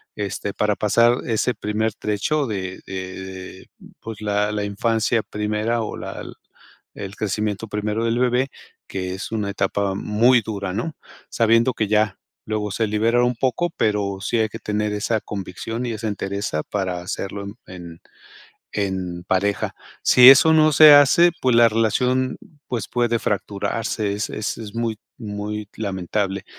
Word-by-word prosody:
este, 100 0 -4
para 105 +1 +1
pasar 115 +4 +3
ese 115 +1 0
primer 105 +1 -1
trecho 120 +9 -1
de 95 -4 -4
de 95 0 -6
de 95 0 -9 0.3
pues 110 -1 -8
la 105 0 0
la 105 -1 -2
infancia 110 +2 0
primera 105 +3 -1
o - - -5
la - - -6 0.7
el 100 0 -7
crecimiento 105 +1 -2
primero 105 +2 -2
del 115 +1 +1
bebé, 125 +2 +1 0.4
que 95 -1 -4
es 95 - -6
una 105 -2 -1
etapa 100 0 -1
muy 115 +5 +3
dura, 100 -3 -4
¿no? 115 +10 -2 0.4
Sabiendo 115 +2 +3
que 110 -3 -2
ya 105 -1 +1 0.3
luego 105 -1 -2
se 110 +3 0
liberan 115 +3 +2
un 125 0 +2
poco, 135 +8 0
pero 100 -2 0
sí 95 +5 -1
hay 110 -1 +1
que 115 - -7
tener 105 -1 -2
esa 105 +2 -1
convicción 105 +4 -5
y 120 - -2
esa 110 0 -3
entereza 100 -5 -3
para 95 -3 -3
hacerlo 100 +2 -5
en 100 +2 -8
en 85 -2 -10 0.7
en 95 -3 -3
pareja. 95 -1 0 0.3
Si 125 0 +8
eso 150 +4 +7
no 155 -1 +5
se 150 +1 +9
hace, 170 +5 +6
pues 125 -2 +3
la 115 0 +7
relación, 125 +4 +1 0.3
pues 120 -5 -3
puede 120 -1 +1
fracturarse, 105 +1 -2
es 105 +1 -2
es 110 - -3
es 110 -2 -8
muy 115 -2 -2 0.2
muy 105 -1 -5
lamentable. 100 -1 -2
105 Hz, 155 wpm, -22 LUFS, 100-115 Hz, 0.7 s, se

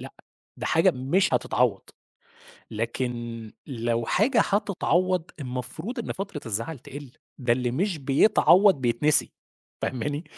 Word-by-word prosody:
لأ، - - -9 0.4
ده - - -4
حاجة - - +4
مش 135 +10 +1
هتتعوّض. - - +1 0.9
لكن 115 0 -4
لو 115 -3 -2
حاجة 235 +5 +3
هتتعوّض، 185 -3 0
المفروض 130 - -5
إن 230 - -3
فترة 195 -6 -6
الزعل 115 +7 -3
تِقِل، 140 -1 -10 0.3
ده 125 -3 +1
اللي 125 0 0
مش 175 +6 -1
بيتعوّض 185 +7 +5
بيتنسي، 145 +5 +2 0.5
فاهماني؟ 145 +5 -2
140 Hz, 115 wpm, -25 LUFS, 120-185 Hz, 0.9 s, بيتعوّض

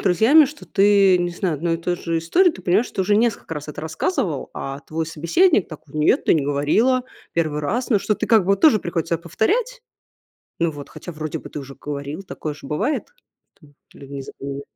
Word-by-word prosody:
друзьями, 225 - +5
что 290 +2 -9
ты, 195 -2 +4
не 175 0 -1
знаю, 175 -1 -2
одной 165 +3 -1
и - - -1
той 175 +1 -2
же 165 -1 -2
истории, 350 - +3
ты 330 - -12
понимаешь, 195 +7 +2
что 190 - -2
уже 205 +2 +2
несколько 220 -7 0
раз 150 0 -7
это 150 - -6
рассказывала, 160 - -2
а 135 +1 -6
твой 160 +2 -4
собеседник 170 - +2
такой: 155 -2 -12
"Нет, 150 0 +2
ты - - +4
не 150 - +1
говорила, 215 - +2 0.3
1 155 -3 0
раз". 240 - -2
Ну, 210 - +4
что 210 - 0
ты - - -2
как 225 -3 +5
бы 180 - -6
вот 195 - +3
тоже 295 -10 +6
приходится 165 -1 -2
повторять. 460 - -1 0.8
Ну 170 -1 +1
вот, 145 -2 -9
хотя 175 - -9
вроде 155 0 -4
бы - - -11
ты - - -6
уже 135 -1 -9
говорила, 145 +5 -6
такое 155 -5 -6
же 145 - -12
бывает, 265 - -1 0.5
что 150 - -19 0.2
либо 140 0 -11
не 135 - -5
запоминаешь. 140 +1 -7
170 Hz, 210 wpm, -21 LUFS, 150-215 Hz, 0.8 s, тоже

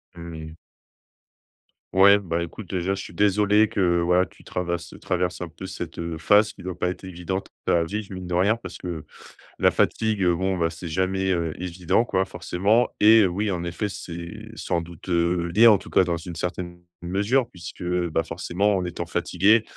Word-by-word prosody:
Mmh 85 0 -8
mh. 80 +1 -9 1.4
Ouais, 100 +2 +7
bah, 85 -3 -2
écoute, 90 +3 -9
déjà 95 +1 -1
je 95 - -5
suis - - -9
désolé 105 +1 +3
que 85 -3 +2
voilà, 90 +2 +3
tu - - -19
travarse 85 -1 -4
traverses 90 -1 -1
un 90 - -4
peu 85 +3 -10
cette, 85 -3 -7
heu, 85 -1 -4
phase 105 +6 +4
qui - - -15
doit 90 -1 -5
pas 90 - 0
être 95 +1 -7
évidente 95 +1 -4 0.2
à 85 -1 +3
vivre, 105 +3 -5
mine 90 -1 -6
de 90 - -4
rien 100 +6 +3
parce 95 -6 -9
que 85 -4 -6 0.5
la - - +5
fatigue, 110 -4 +1
bon, 95 +2 +1
bah, 85 -1 +1
c'est 85 +1 -8
jamais, 95 +3 0
heu, 85 -3 0
évident 90 +3 +1
quoi 95 -5 0
forcément, 95 +6 +1
et 110 -2 +7
oui, 100 +4 -1
en 85 -2 -2
effet, 85 +4 -2
c'est 95 +4 -8
sans 85 -6 -1
doute, 85 +1 -11
heu, 85 0 +1
lié, 115 +2 +8
en 105 -3 +7
tout - - -13
cas - - +5
dans 85 -2 -1
une 85 +1 -8
certaine 85 0 -4 0.2
mesure 105 +8 +1
puisque, 90 0 -9
bah, 85 -2 0
forcément 100 +3 0
en 90 - -1
étant 90 - -4
fatigué 105 +5 +3
90 Hz, 190 wpm, -24 LUFS, 85-100 Hz, 1.4 s, lié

